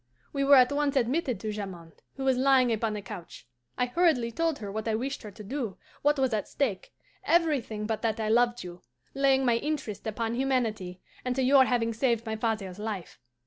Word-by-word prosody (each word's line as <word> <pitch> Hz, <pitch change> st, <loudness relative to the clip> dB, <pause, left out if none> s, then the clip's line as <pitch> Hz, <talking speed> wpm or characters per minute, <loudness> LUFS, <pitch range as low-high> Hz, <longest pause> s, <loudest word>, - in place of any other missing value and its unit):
"We 275 Hz, -1 st, 0 dB
were 280 Hz, +1 st, +7 dB
at 255 Hz, 0 st, +6 dB
once 285 Hz, -1 st, 0 dB
admitted 255 Hz, -, 0 dB
to 215 Hz, -, -3 dB
Jamond, 185 Hz, -6 st, -8 dB
who 270 Hz, -, -5 dB
was 265 Hz, -1 st, +3 dB
lying 255 Hz, -2 st, +4 dB
upon 220 Hz, -1 st, -1 dB
a 205 Hz, -, -5 dB
couch. 185 Hz, -, -9 dB, 0.3 s
I 250 Hz, -, +2 dB
hurriedly 250 Hz, -4 st, +2 dB
told 325 Hz, +4 st, 0 dB
her 205 Hz, -2 st, -6 dB
what 220 Hz, +2 st, -4 dB
I 220 Hz, -, +1 dB
wished 265 Hz, +5 st, -3 dB
her 215 Hz, -, -8 dB
to 205 Hz, +1 st, -11 dB
do, 235 Hz, -2 st, -4 dB, 0.2 s
what 295 Hz, +1 st, +3 dB
was 265 Hz, -3 st, +1 dB
at 210 Hz, -2 st, -1 dB
stake, 225 Hz, -10 st, -2 dB, 0.3 s
everything 285 Hz, -11 st, +1 dB
but 220 Hz, 0 st, -2 dB
that 225 Hz, -1 st, -1 dB
I 220 Hz, -, -1 dB
loved 240 Hz, +1 st, +2 dB
you; 175 Hz, 0 st, -9 dB, 0.3 s
laying 270 Hz, -1 st, +3 dB
my 235 Hz, -2 st, +3 dB
interest 235 Hz, -8 st, -4 dB
upon 225 Hz, +1 st, -2 dB
humanity 230 Hz, -8 st, -1 dB, 0.2 s
and 250 Hz, 0 st, -1 dB
to 265 Hz, -, +1 dB
your 265 Hz, 0 st, +6 dB
having 230 Hz, -2 st, 0 dB
saved 235 Hz, -1 st, 0 dB
my 220 Hz, -1 st, -2 dB
father's 215 Hz, -4 st, -2 dB
life. 210 Hz, -5 st, -5 dB
235 Hz, 205 wpm, -28 LUFS, 215-270 Hz, 0.3 s, were